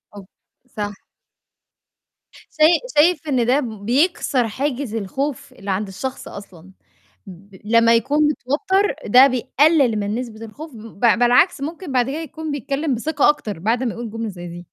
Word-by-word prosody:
أوك 200 -1 -12 0.4
صح. 205 -3 -5 1.6
شاي 315 +2 +4 0.2
شايف 320 +1 +3
إن 255 -5 +1
ده 260 +4 +3
بيكسر 245 - 0
حاجز 255 0 -3
الخوف 265 +7 -4
اللي 195 0 -6
عند 200 +2 -2
الشخص 255 +7 -6
أصلًا؟ 190 -2 -12 0.6
ب 190 +2 -14
لمّا 230 +1 +4
يكون 275 +6 0
متوتر 315 - 0
ده 255 +6 +7
بيقلل 265 -1 +2
من 205 +1 -2
نسبة 225 -2 -6
الخوف 290 +5 -11
ب 220 -2 -12
بالعكس 245 - +4
ممكن 320 +2 -6
بعد 255 0 +1
كده 295 - -3
يكون 315 -1 -6
بيتكلم 280 +1 -2
بثقة 295 +4 +1
أكتر 220 - -2
بعد 230 +7 0
ما 235 - -2
يقُول 235 -1 -6
جملة 225 0 -4
زي 175 -2 -9
دي. 175 +1 -9
245 Hz, 150 wpm, -20 LUFS, 215-290 Hz, 1.6 s, ده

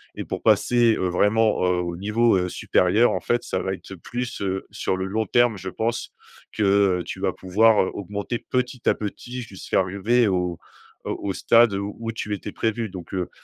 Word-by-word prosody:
et - - -5
pour - - -5
passer, 120 -2 +4
heu, 90 - 0
vraiment, 105 +3 +2
heu, 90 -1 +2
au 85 -1 -4
niveau, 105 +5 +2
heu, 90 -1 0
supérieur, 105 +9 +2
en - - -1
fait, 120 - 0
ça 95 - -2
va 95 - -2
être 95 - -9
plus, 120 +7 -5
heu, 95 -1 -2
sur 95 - -2
le 95 - -2
long 110 +2 -2
terme, 120 -1 +3
je 95 - -5
pense, 115 +5 -3 0.4
que, 110 - -2 0.4
heu, - - -6
tu - - -7
vas - - 0
pouvoir, 105 +3 +3
heu, - - -3
augmenter 100 +4 -4
petit 125 -1 -1
à - - +3
petit 120 +4 -6
jusqu'à 95 -3 -2
arriver 105 +6 +1
au, 90 -2 0 0.5
heu, - - -2
au 100 -1 -3
stade, 115 +2 +4
heu, 100 - -2
où 115 +3 -5
tu 105 -2 -4
étais 100 0 -5
prévu. 110 -1 -2
Donc, 90 -1 -10
heu, 90 -2 -2
105 Hz, 205 wpm, -23 LUFS, 95-115 Hz, 0.5 s, passer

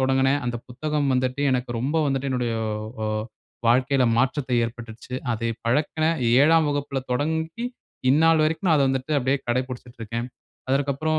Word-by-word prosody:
தொடங்குனேன். 135 +1 +2
அந்த 120 0 -1
புத்தகம் 145 +3 -1
வந்துட்டு 130 +2 0
எனக்கு 125 -1 -1
ரொம்ப 140 +6 -1
வந்துட்டு 135 0 -1
என்னுடைய 125 -3 -1 0.5
அ - - -1 0.6
வாழ்க்கையில 130 +2 +3
மாற்றத்தை 130 +1 +1
ஏற்பட்டிடுச்சு. 115 +1 -8 0.2
அதை 115 +1 -2 0.2
பழக்கின 150 +5 +1 0.3
7ம் 160 +2 +5
வகுப்பில 140 -1 -2
தொடங்கி 160 - -1 0.5
இந்நாள் 160 +3 +5
வரைக்கும் 160 +4 -1
நான் 160 - +5
அத 140 - +4
வந்துட்டு 135 +3 -1
அப்படியே 135 +1 +1
கடைப்புடிச்சிட்டு 125 0 -3
இருக்கேன். 115 +2 -3 0.4
அதற்க்கப்புறம் 140 +3 +1
135 Hz, 140 wpm, -24 LUFS, 125-150 Hz, 0.6 s, 7ம்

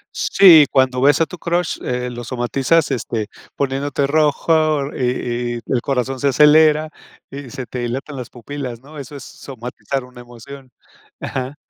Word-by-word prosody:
Sí, 165 -7 +6
cuando 130 -1 +1
ves 145 +4 +4
a - - +4
tu 180 - -11
crush, 170 0 -1
eh, 125 0 -3
lo 120 0 -7
somatizas 135 +6 0
este, 115 -4 -3 0.3
poniéndote 140 +1 -1
rojo 155 0 +1
y 120 -1 -2
y - - -5
el 125 -3 -1
corazón 135 -1 -2
se 140 - +1
acelera 155 +2 +5 0.4
y 140 -2 -8
se 130 +1 -7
te 125 - -7
dilatan 130 +4 -4
las 125 -2 -7
pupilas, 125 -1 -7
¿no?, 145 +3 -12
eso 145 +1 -9
es 140 - -9
somatizar 130 +1 -6
una 125 -1 -13
emoción, 125 +3 -12 0.5
ajá. 130 +2 -5
135 Hz, 160 wpm, -19 LUFS, 125-150 Hz, 0.5 s, Sí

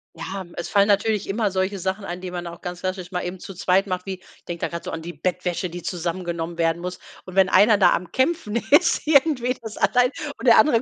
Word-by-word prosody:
Ja, 190 0 -6
es 170 - -3
fallen 200 0 +3
natürlich 205 0 +2
immer 205 0 0
solche 190 +1 -1
Sachen 190 +3 -2
an, 175 -2 -5
die 180 -1 -6
man 175 -1 -5
auch 170 0 -8
ganz 180 -1 -6
klassisch 185 -1 -4
mal 180 - -1
eben 180 +1 -5
zu 195 - -9
zweit 190 +2 +2
macht, 185 -1 -3
wie 195 -1 -3
ich 185 - -22
denke 175 -1 -5
da - - +1
gerade 170 0 -6
so - - -5
an 165 - -5
die 175 +2 -7
Bettwäsche, 180 +2 -2
die 175 0 -8
zusammengenommen 170 -1 -3
werden 165 0 +1
muss. 180 +1 -5 0.2
Und 185 0 -11
wenn 190 -1 +5
einer 205 +3 +5
da 185 -3 +5
am 175 0 -3
Kämpfen 260 -5 0
ist 320 +1 +4
irgendwie, 280 -4 +3
das 220 -2 -8
allein, 250 +1 +3 0.3
und - - -4
der 235 - +8
andere, 260 -7 +5
185 Hz, 245 wpm, -23 LUFS, 175-210 Hz, 0.3 s, der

